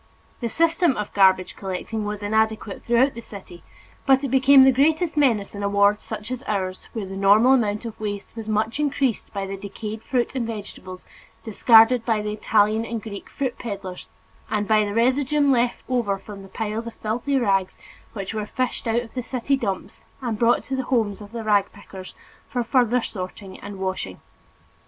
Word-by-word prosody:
The 235 - -2
system 330 +1 +2
of 210 -1 -4
garbage 190 -2 +3
collecting 200 +3 -4
was 210 0 -4
inadequate 220 -1 0
throughout 240 +4 +3
the 235 - -8
city 190 -5 -11 0.5
but 270 0 +5
it 275 - -1
became 270 +1 +7
the 265 - +7
greatest 310 +6 +2
menace 235 -9 +2
in 200 - -6
a 200 - 0
ward 200 +1 +3
such 215 +4 -7
as 255 -1 -4
ours, 185 -3 -3
where 220 -4 -4
the 190 0 -7
normal 205 +6 +5
amount 215 -3 +1
of 225 -2 -7
waste 205 -2 -4
was 225 -2 -7
much 220 +4 -1
increased 275 -5 0
by 200 -1 -3
the 195 0 -5
decayed 210 +2 -7
fruit 245 0 -1
and 250 -4 -2
vegetables 200 -4 -8 0.4
discarded 225 +2 +5
by 225 -2 +1
the 210 0 -3
Italian 215 +1 +2
and 230 -2 -5
Greek 200 -3 -8
fruit 260 -3 -3
peddlers, 200 -5 -7 0.4
and 210 -1 -1
by 215 -1 +4
the 205 - -4
residuum 275 +4 +2
left 240 -1 +1
over 235 -6 0
from 200 0 -10
the 195 - -13
piles 220 +2 -4
of 230 - -8
filthy 235 +6 -1
rags 195 -6 +1 0.4
which 200 -1 -5
were 215 -1 -3
fished 255 0 -3
out 230 +1 +2
of 230 - -12
the 255 - -3
city 255 +2 -1
dumps 195 -8 -4 0.2
and 235 -5 -3
brought 235 0 +3
to 270 - -4
the 265 - -2
homes 220 -5 0
of 205 0 -11
the 230 -1 -5
rag 205 -2 +2
pickers 185 -1 -11 0.3
for 245 -3 -1
further 245 0 +2
sorting 185 0 -7
and 200 -1 -8
washing. 190 - -4
220 Hz, 190 wpm, -23 LUFS, 200-250 Hz, 0.5 s, became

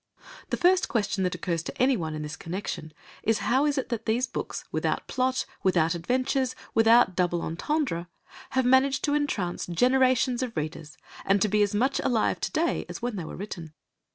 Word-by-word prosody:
The - - -1
first 365 +1 +4
question 205 -4 0
that 180 - -1
occurs 170 -1 -2
to - - -7
anyone 210 - +1
in 155 - -4
this 150 +1 -5
connection 165 -3 -5 0.3
is 225 0 +2
how 270 +4 +3
is 290 -1 0
it 265 - -2
that 230 -2 -4
these 235 +3 +2
books, - - -5
without - - -1
plot, 260 0 0 0.2
without 170 -3 +2
adventures, 255 +8 0 0.2
without 225 -3 +5
double 175 -2 +1
entendre, 175 - -2 0.4
have 260 -1 +1
managed 260 +2 +4
to 290 - +1
entrance 230 -12 -1
generations 255 +5 +3
of 245 -7 -4
readers, 155 0 -5 0.3
and 195 +1 +3
to 215 - +3
be 210 +1 +2
as 205 0 +1
much 260 +6 +1
alive 230 -4 +1
to - - -2
day 330 +2 0
as - - -7
when 240 -2 -2
they 180 -5 -4
were - - -7
written? 175 -5 -7
225 Hz, 185 wpm, -27 LUFS, 175-260 Hz, 0.4 s, without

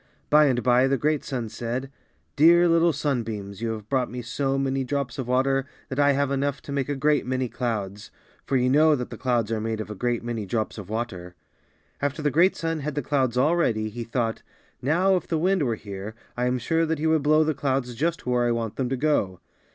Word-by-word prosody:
By 150 0 +7
and 125 -3 +1
by, 125 +1 +4
the 135 0 +1
great 150 +2 0
sun 125 -4 -3
said, 120 +4 -4 0.4
^^Dear 170 +4 +6
little 165 0 +4
sunbeams, 115 -9 -3
you 115 -1 -1
have 105 -1 -8
brought 130 0 0
me 125 0 -6
so 135 +3 -1
many 135 0 0
drops 135 0 -3
of 130 - -3
water 135 +2 +1 0.2
that 130 - -3
I 145 0 +5
have 140 0 0
enough 140 0 -1
to - - -8
make 140 -1 -1
a 145 - 0
great 145 +2 +2
many 130 0 -1
clouds," 105 -4 -4 0.3
for 135 - 0
you 125 0 +2
know 150 +4 +5
that 125 -3 -5
the 115 - -7
clouds 120 -4 0
are 110 -1 -1
made 110 0 -2
of 110 0 -5
a - - -5
great 120 +2 -1
many 115 -4 -4
drops 110 +1 -2
of 100 - -9
water. 95 -6 -4 0.7
After 145 +2 -2
the 145 - +2
great 170 +7 +4
sun 165 -1 -2
had 150 0 -4
the 145 - -1
clouds 130 -3 0
all 150 +7 +3
ready, 110 -10 +1
he 120 +2 -6
thought, 115 -1 -2 0.4
'^Now 180 +8 +3
if - - -6
the 165 - 0
wind 185 +3 +2
were 120 -5 +1
here 100 0 -8 0.2
I 125 0 0
am 125 0 +1
sure 165 +7 0
that 160 0 0
he 155 - -3
would 160 -1 +3
blow 155 +2 +4
the 155 0 0
clouds 135 -3 -1
just 165 +7 -2
where 125 -1 +1
I - - +2
want 115 -2 -3
them 130 -2 -1
to 135 - -1
go." 120 -11 0
130 Hz, 235 wpm, -25 LUFS, 115-145 Hz, 0.7 s, By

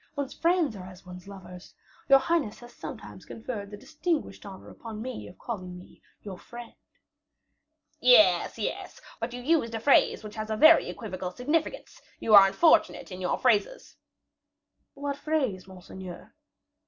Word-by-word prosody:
One's 280 -2 -4
friends 335 -7 +1
are 185 -2 -9
as 185 0 -14
one's 180 0 -11
lovers. 185 -2 -12 0.3
Your 275 - +9
highness 270 -5 -1
has 240 0 -13
sometimes - - -9
conferred 220 -3 -7
the 205 - -9
distinguished 310 - -4
honor 190 -1 -11
upon 220 -2 -9
me 250 +2 -6
of 180 - -14
calling 185 -6 -7
me 180 - -16 0.2
your 195 -3 -8
friend." 240 -1 -11 1.3
"Yes, 215 -8 +5
yes,; - - -5 0.2
but 230 +1 -4
you 245 0 -8
used 275 -6 +1
a - - -3
phrase 265 -2 +3
which 210 -1 -9
has 215 0 -5
a 215 - -2
very 315 +6 +6
equivocal 185 -5 -6
significance; 300 - -3 0.2
you 220 - 0
are 200 -1 +10
unfortunate 270 - +2
in 185 0 -8
your 180 - -1
phrases." 250 - 0 1.0
"What 280 0 -4
phrase, 265 -14 -2
monseigneur?" 185 -1 -11
220 Hz, 155 wpm, -27 LUFS, 190-275 Hz, 1.3 s, are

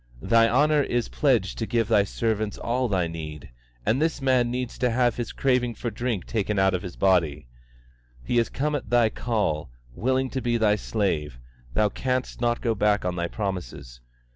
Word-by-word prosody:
Thy 115 0 +4
honour 150 +4 +3
is 120 -3 -1
pledged 120 -11 +1
to 115 - -2
give 115 -3 +1
Thy 105 -3 +4
servants 110 0 -2
all 125 +2 -1
they 95 -5 0
need, 80 -4 -7 0.3
and 130 +6 +2
this 160 0 0
man 130 -3 +2
needs 125 0 -4
to 125 0 +2
have 120 0 +2
the 120 - -2
craving 125 -3 +1
for 120 - -4
drink 115 -3 -2
taken 105 -2 -1
out 95 0 +3
of 90 - -1
his 90 -3 -7
body. 85 -7 +2 0.8
He 120 - 0
has 115 - +2
come 150 +2 -1
at 145 - -3
Thy 120 -2 +4
call, 105 - -1 0.2
willing 130 - 0
to 130 - -2
be 120 -1 +1
Thy 105 -2 +3
slave; 90 - -2 0.4
Thou 105 +3 +3
canst 130 +3 -2
not 120 0 +1
go 115 -2 +1
back 105 -2 +1
on 90 -1 -1
Thy 85 -1 -1
promises. 75 - -5
115 Hz, 190 wpm, -25 LUFS, 95-125 Hz, 0.8 s, Thy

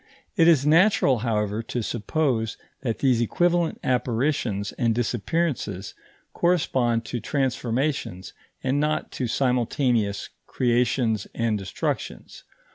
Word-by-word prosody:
It 165 -5 +5
is 150 -5 +5
natural, 160 - +4
however, 105 -2 -1
to 115 +1 -4
suppose 115 0 -1 0.2
that 115 -5 -2
these 125 -4 +2
equivalent 175 +7 +1
apparitions 120 -4 0
and 115 -3 0
disappearances 120 - -1 0.4
correspond 130 -10 +1
to 120 - -3
transformations 125 - -2 0.3
and 135 +2 +1
not 150 +1 -1
to 125 - -3
simultaneous 120 -4 0 0.2
creations 120 -3 +1
and 115 -2 +1
destructions. 95 -2 -4
125 Hz, 105 wpm, -25 LUFS, 110-140 Hz, 0.4 s, It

